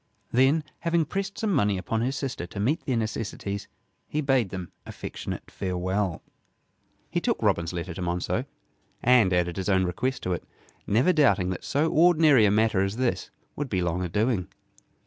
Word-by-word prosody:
Then, 135 +6 +4 0.2
having 170 -1 +1
pressed 195 +5 -4
some 215 -3 0
money 105 - +2
upon 110 +4 -2
his 130 +3 0
sister 135 -10 -4
to 100 - -8
meet 140 - 0
their 130 -3 +1
necessities, 105 -2 -3 0.4
he 150 - -2
bade 135 -8 +2
them 90 -2 -6
affectionate - - -7
farewell. 95 0 -2 0.9
He - - 0
took - - 0
Robin's 85 0 +1
letter 90 0 -4
to 90 - -7
Monceux, 90 0 -1 0.6
and 120 -6 +5
added 90 -1 +1
his 95 +1 -2
own 95 -1 +3
request 120 +10 -2
to 90 - 0
it, 85 - -4 0.4
never 125 - +3
doubting 125 - +3
that 90 - -5
so 155 +3 +1
ordinary 160 -7 +5
a - - +4
matter 110 -2 +3
as 95 +2 -1
this 125 -1 -1 0.3
would 145 -2 -3
be 95 -4 0
long 85 +1 -1
a 90 - -2
doing. 105 -1 0
105 Hz, 175 wpm, -26 LUFS, 95-135 Hz, 0.9 s, and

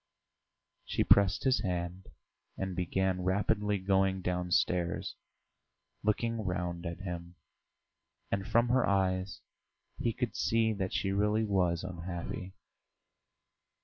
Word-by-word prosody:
She - - 0
pressed 100 -2 +5
his 130 -5 +3
hand 90 -1 -3 0.5
and 95 -1 -3
began 95 +1 0
rapidly 105 +2 +1
going 95 0 +1
downstairs, 90 -1 0 0.9
looking 115 +1 0
round 90 -2 -2
at 85 +1 -6
him, 85 -2 -6 1.0
and 100 -1 -1
from 115 +4 +3
her 130 0 +4
eyes 95 -1 0 0.6
he 115 - +1
could 125 0 -3
see 115 -1 +2
that 95 -2 -2
she 95 0 0
really 105 +2 +2
was 90 -5 +1
unhappy. 90 +3 -5
95 Hz, 110 wpm, -31 LUFS, 90-105 Hz, 1.0 s, pressed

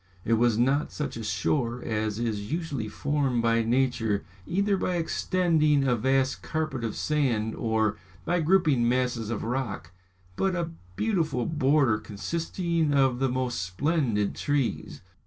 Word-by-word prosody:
It 115 - +2
was 115 -1 +3
not 135 +5 +2
such 145 -3 -4
a 115 - -5
shore 115 +5 -1
as 110 -1 -2
is 110 -2 -3
usually 150 -9 -2
formed 135 -1 0
by 115 0 +3
nature, 115 -5 +1 0.2
either 200 +3 +1
by 180 -1 -1
extending 165 -3 +2
a 125 -2 +2
vast 130 +3 +1
carpet 155 -6 -3
of 110 -2 -2
sand, 120 -8 0
or 110 -2 0 0.3
by 175 - +1
grouping 155 -8 +3
masses 125 -3 0
of 115 - -3
rock, 115 -8 -3 0.4
but 190 -1 0
a 170 -1 -2 0.2
beautiful 160 - 0
border 140 -7 +2
consisting 165 - -1
of 135 -3 +3
the 135 0 +1
most 125 -4 -1
splendid 110 - 0
trees. 145 -4 -2
130 Hz, 140 wpm, -27 LUFS, 115-155 Hz, 0.4 s, was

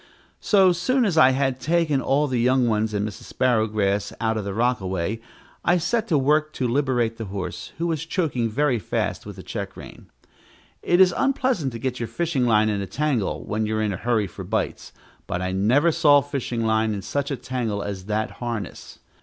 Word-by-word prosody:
So 190 -3 +4
soon 235 +9 +1
as 190 -6 0
I 155 -5 +7
had 130 -1 0
taken 160 -3 +1
all 140 +3 +2
the 130 -4 -1
young 125 +1 +3
ones 110 -1 +1
and 105 0 -1
Mrs. 105 - -10
Sparrowgrass 110 -5 +1
out 110 0 0
of 110 - -2
the 100 - -3
rockaway, 105 -3 -1 0.4
I 175 - +3
set 220 +7 0
to 160 - +2
work 150 +3 +2
to 125 - -1
liberate 120 -3 0
the 115 - -5
horse, 95 -2 -6
who 165 - -2
was 165 -2 -2
choking 145 -10 0
very 130 +1 +1
fast - - -3
with - - -8
the - - -10
check - - -6
rein. - - -11 0.7
It 175 - +2
is 185 -2 +6
unpleasant 260 - +1
to - - -4
get 130 +1 -3
your 115 - -2
fishing 160 -8 0
line 110 -1 +4
in 105 -2 -1
a 100 - -4
tangle 130 - -1
when 105 +1 -1
you 110 0 -1
are 110 - 0
in 105 -2 0
a - - -4
hurry 115 -3 +1
for 95 - -8
bites, - - -3 0.4
but 90 - -2
I 90 0 -2
never 120 - +3
saw 150 -3 +5
fishing 135 -5 -3
line 110 -1 +1
in 100 - -6
such 140 +5 -2
a 140 - -1
tangle 115 -6 -3
as 95 -2 -5
that 110 +1 -1
harness. 115 -4 -5
125 Hz, 205 wpm, -23 LUFS, 110-150 Hz, 0.7 s, I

